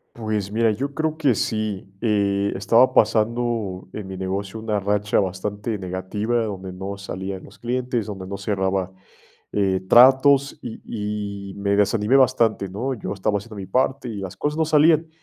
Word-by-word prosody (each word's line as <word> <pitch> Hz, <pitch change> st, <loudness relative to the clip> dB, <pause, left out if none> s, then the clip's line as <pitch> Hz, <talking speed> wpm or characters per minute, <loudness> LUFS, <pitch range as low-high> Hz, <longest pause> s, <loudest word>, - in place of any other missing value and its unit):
Pues, 110 Hz, -3 st, -3 dB
mira, 115 Hz, +1 st, +2 dB
yo 140 Hz, +6 st, -3 dB
creo 155 Hz, 0 st, -1 dB
que 140 Hz, -7 st, +2 dB
sí. 105 Hz, -3 st, -2 dB
Eh, 100 Hz, -3 st, +1 dB
estaba 115 Hz, +6 st, +4 dB
pasando 110 Hz, -3 st, +1 dB
en 105 Hz, -3 st, -6 dB
mi 95 Hz, 0 st, -7 dB
negocio 95 Hz, +3 st, -3 dB
una 110 Hz, -1 st, -1 dB
racha 105 Hz, +1 st, +1 dB
bastante 105 Hz, +3 st, -3 dB
negativa, 100 Hz, +5 st, -2 dB
donde 95 Hz, -3 st, -5 dB
no 95 Hz, +2 st, -6 dB
salían 95 Hz, -1 st, -6 dB
los -, -, -16 dB
clientes, 120 Hz, -2 st, -2 dB
donde 95 Hz, -3 st, -6 dB
no 100 Hz, +1 st, -5 dB
cerraba, 95 Hz, -2 st, -1 dB, 0.6 s
eh, 95 Hz, -2 st, +1 dB
tratos, 135 Hz, +3 st, +6 dB
y 105 Hz, -3 st, -5 dB
y -, -, -9 dB
me 100 Hz, 0 st, 0 dB
desanimé 105 Hz, +3 st, +2 dB
bastante, 120 Hz, -6 st, +3 dB
¿no? 120 Hz, +8 st, -3 dB
Yo 110 Hz, -, -5 dB
estaba 105 Hz, +1 st, 0 dB
haciendo 105 Hz, +1 st, -11 dB
mi 95 Hz, -, -6 dB
parte 130 Hz, +2 st, 0 dB
y 110 Hz, -, -6 dB
las 95 Hz, -1 st, -6 dB
cosas 150 Hz, +8 st, -2 dB
no 160 Hz, -, +2 dB
salían. 160 Hz, +1 st, +4 dB
105 Hz, 165 wpm, -23 LUFS, 100-120 Hz, 0.6 s, tratos